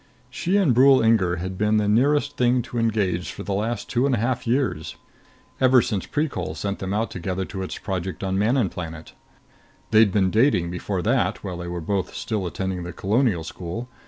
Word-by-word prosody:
She 175 +9 0
and 180 -11 +3
Brule 130 +2 +6
Inger 105 -6 +3
had 95 +2 -5
been 105 0 +2
the 105 -1 +1
nearest 145 +7 +2
thing 125 0 +2
to 120 - -4
engaged 100 -6 0
for - - -8
the 100 - -3
last 110 +4 -2
two 125 +3 +1
and 135 - +2
a - - -2
half 120 +2 -1
years, 120 - -1 0.6
ever 130 -1 +6
since 105 -5 -2
Precol 125 - -2
sent 100 +5 -3
them 95 0 -4
out 110 +3 -1
together 95 +1 -3
to 95 0 -6
its 95 - -5
project 95 -2 -4
on 95 -1 -1
Manon 110 +2 +2
Planet. 80 -2 -8 0.8
They'd 110 -2 +6
been 95 -2 +2
dating 110 -8 +2
before 90 +1 -3
that, - - 0
while 90 -3 -5
they 90 0 -6
were 85 0 -4
both 95 +2 -2
still 105 -5 -2
attending 95 0 -3
the 85 0 -6
Colonial 105 -2 +1
School. 90 +9 -6
105 Hz, 195 wpm, -23 LUFS, 90-120 Hz, 0.8 s, Brule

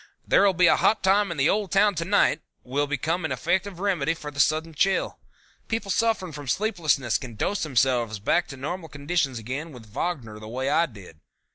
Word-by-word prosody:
There'll 200 -2 +4
Be 180 +1 +4
a - - +6
Hot 220 - +2
Time 200 +2 +3
In 170 - -4
The 135 +2 +3
Old 205 -2 0
Town 200 +2 +4
To 165 -1 -3
Night 190 -5 +3 0.2
will 145 +3 -1
become 160 +5 -1
an 160 - -2
effective 185 +1 -1
remedy 175 -6 0
for 150 -2 -7
a 145 -1 -9
sudden 160 +2 +2
chill. 190 +6 0 0.5
People 225 -3 -2
suffering 225 -6 0
from 145 -2 -9
sleeplessness 155 - +1
can 120 -4 -9
dose 195 - -1
themselves 125 -6 +1
back 170 - +1
to 135 - -9
normal 160 +5 -5
conditions 145 -2 -1
again 135 +9 -5
with 125 -5 -12
Wagner 110 -1 -4
the 110 - -10
way 130 +4 -2
I 165 +1 +3
did. 100 - -14
160 Hz, 195 wpm, -25 LUFS, 130-185 Hz, 0.5 s, a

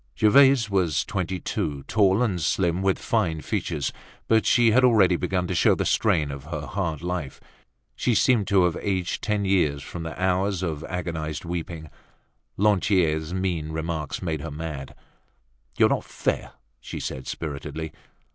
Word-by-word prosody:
Gervaise 130 +1 +5
was 90 -7 +1
twenty 95 -1 -3
two, 70 -4 -3
tall 100 - +3
and 95 -7 -1
slim 85 +3 +1
with 95 -1 +2
fine 85 -9 0
features, 85 -9 -2 0.3
but 110 -1 +3
she 120 -2 +5
was 130 +4 +4
already 105 -7 +5
beginning 90 +1 -1
to - - 0
show - - +4
the - - -2
strain 75 -2 +2
of 70 0 -8
her 80 -1 -5
hard 85 -5 -3
life. 90 -6 -4 0.6
She 120 - +1
seemed 105 0 +3
to 95 -2 +4
have 90 -2 +1
aged 95 -3 -1
ten 105 -2 0
years 75 -8 +1
from 85 - -7
the 80 +1 -6
hours 95 0 +1
of 80 -3 -3
agonized 85 -4 -4
weeping. 85 -2 -5 0.7
Lantier's 90 -6 +2
mean 90 -4 -2
remark 80 0 -3
made 80 -4 -2
her 80 - -5
mad. 75 -2 -6 0.8
"You're - - +6
not - - 0
fair," - - -2 0.3
she - - -7
said 65 0 -5
spiritedly. 80 +1 -5
90 Hz, 155 wpm, -25 LUFS, 80-100 Hz, 0.8 s, You're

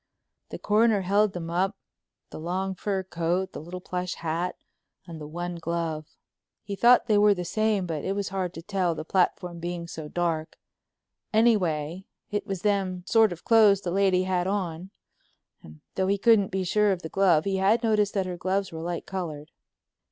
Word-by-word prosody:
The - - -6
Coroner 215 -1 +3
held 200 +2 +2
them 170 -2 -5
up, 190 +3 0 0.5
the - - -8
long 185 +4 -2
fur 190 +1 -2
coat, 180 +1 -1
the - - -6
little 175 +3 -7
plush 180 -1 -4
hat, 170 +2 -2 0.5
and 165 -3 -9
the 150 - -7
one 175 +2 -5
glove. 165 -2 -3 0.6
He 200 -1 -5
thought 240 +4 +5
they 215 -3 +3
were 205 -1 +5
the 180 -1 -4
same 215 +1 0
but 160 -4 -4
it 195 - -1
was 200 -1 -2
hard 185 -2 -3
to 165 - -8
tell, 185 -3 0
the 155 - -6
platform 180 -1 0
being 170 0 -4
so 160 -2 -7
dark—anyway, 175 +2 -2 0.3
it 205 +1 -2
was 195 -3 -4
them 190 -3 0
sort 220 0 +4
of 170 - -8
clothes 215 -4 +5
the 175 - -3
lady 190 -1 +3
had 185 -1 0
on, 185 -3 -3 0.7
and 75 -1 -14
though 190 0 0
he 200 +1 +2
couldn't 210 -1 +4
be 190 0 -2
sure 210 +3 +2
of 185 -2 -3
the - - -4
glove 175 -5 +3
he 195 -1 0
had 210 +5 +2
noticed 210 -2 +2
that 195 -2 +1
her 180 -1 -5
gloves 190 +2 -1
were 160 -1 -6
light 170 0 -4
colored. 160 -5 -5
185 Hz, 185 wpm, -26 LUFS, 170-200 Hz, 0.7 s, thought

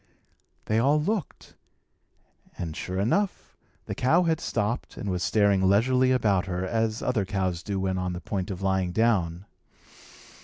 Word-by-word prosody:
They 110 +1 +1
all 140 +5 +3
looked; 195 +1 -3 1.0
and, 80 -3 -5
sure 95 +3 -4
enough, 190 - -1 0.3
the - - -4
cow 165 +8 +3
had 165 -2 +1
stopped 115 +3 -2
and 100 - -3
was 90 -1 -2
staring 100 -2 +3
leisurely 130 +6 +3
about 105 -7 +2
her, 90 0 -2
as 110 +2 -1
other 125 -5 +1
cows 95 -3 -2
do 100 +1 -3
when 95 -1 -1
on 90 -1 -2
the 90 - -5
point 95 +2 -3
of 95 -1 -5
lying 95 -2 0
down. 95 -5 +1
100 Hz, 155 wpm, -26 LUFS, 95-120 Hz, 1.0 s, all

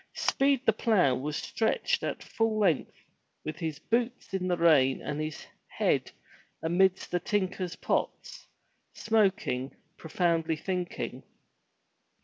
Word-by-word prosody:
Speed 275 -1 +2
the 225 - +5
plough 200 - +3
was 145 +4 -3
stretched 220 - 0
at - - -3
full 225 -1 0
length 185 -8 +1 0.5
with 155 +1 -4
his 160 -4 -3
boots 235 +6 -2
in 185 -1 -1
the 175 -1 +1
rain 145 -6 +4
and 150 +1 -4
his 155 -1 -5 0.2
head - - 0 0.5
amidst 185 +3 +2
the 175 - +1
tinker's 185 -3 -2
pots, - - -3 0.5
smoking, 190 - +1 0.2
profoundly 165 -1 0
thinking. 180 +2 -4
180 Hz, 120 wpm, -29 LUFS, 155-210 Hz, 0.5 s, the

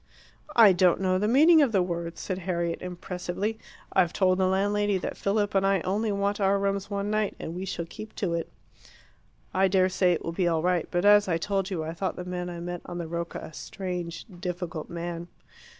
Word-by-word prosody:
"I 220 -5 +8
don't 180 -1 +4
know 185 -1 +1
the 210 - +1
meaning 310 +7 +6
of 275 -5 +3
the 195 -4 +3
word," 170 -1 -4
said 185 -1 -4
Harriet 170 -2 -2
impressively. 180 +4 -4 0.3
"I've 180 -3 +3
told 185 -1 +2
the 185 - +3
landlady 205 +1 +1
that 180 - -4
Philip 205 +1 0
and 195 -1 +3
I 195 -2 +2
only 205 +4 0
want 200 +1 -1
our 195 0 +3
rooms 200 0 -1
one 200 0 -2
night, 215 -1 0
and 160 - -5
we 185 +2 -4
shall 170 -2 -4
keep 215 +6 -10
to 180 -4 -1
it." 165 -1 -2 1.0
"I 190 +1 +4
dare 185 0 +3
say 180 -1 +3
it 165 - -3
will 165 - -2
be 175 +1 0
all 165 -2 +1
right. 180 -2 +1
But, 175 +2 0
as 205 0 +6
I 165 -3 +1
told 195 +2 -1
you, 175 -5 -2
I 160 +1 -4
thought 190 +3 -2
the 180 - -6
man 180 0 -4
I 170 -1 -6
met 175 0 -5
on 175 - -5
the 170 -2 -4
Rocca 170 +1 -4
a - - -9
strange, 180 -2 -5
difficult 175 -3 -4
man." 170 0 -5
185 Hz, 215 wpm, -27 LUFS, 175-200 Hz, 1.0 s, I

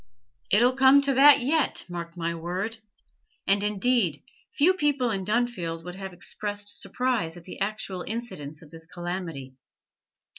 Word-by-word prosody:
It 210 +4 +5
'll 250 +1 +4
come 270 +1 +6
to 275 -1 +1
that 280 +1 +7
yet, 295 +4 0
mark 170 -1 -7
my 170 0 -1
word!' 180 +7 -4 0.7
And, 200 +1 +3
indeed, 210 - +1 0.3
few 340 +6 +4
people 285 -8 +1
in 195 -2 -2
Dunfield 195 -7 -1
would 180 +1 -7
have 190 0 -7
expressed 205 +3 -6
surprise 235 -10 -1
at 175 - -12
the 180 - -10
actual 195 -2 -3
incidence 165 -10 -6
of 150 - -16
this 160 0 -11
calamity. 175 -7 -5
200 Hz, 150 wpm, -26 LUFS, 170-245 Hz, 0.7 s, that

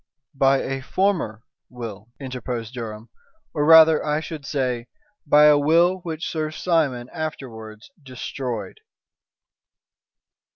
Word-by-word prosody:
"By 135 0 +3
a 135 0 -4
former 160 - -1 0.3
will," 115 -3 -8
interposed 125 -3 -5
Durham, 115 -2 -7 0.4
"or, 145 - 0
rather, 160 0 +7
I 150 0 0
should 155 -3 -8
say, 125 -4 -2 0.4
by 150 +1 +6
a 150 -1 +6
will 170 +5 +3
which 165 -3 -5
Sir 155 -1 -2
Simon 155 -7 0
afterwards 115 -9 -7
destroyed." 130 - -6
135 Hz, 110 wpm, -23 LUFS, 120-155 Hz, 0.4 s, rather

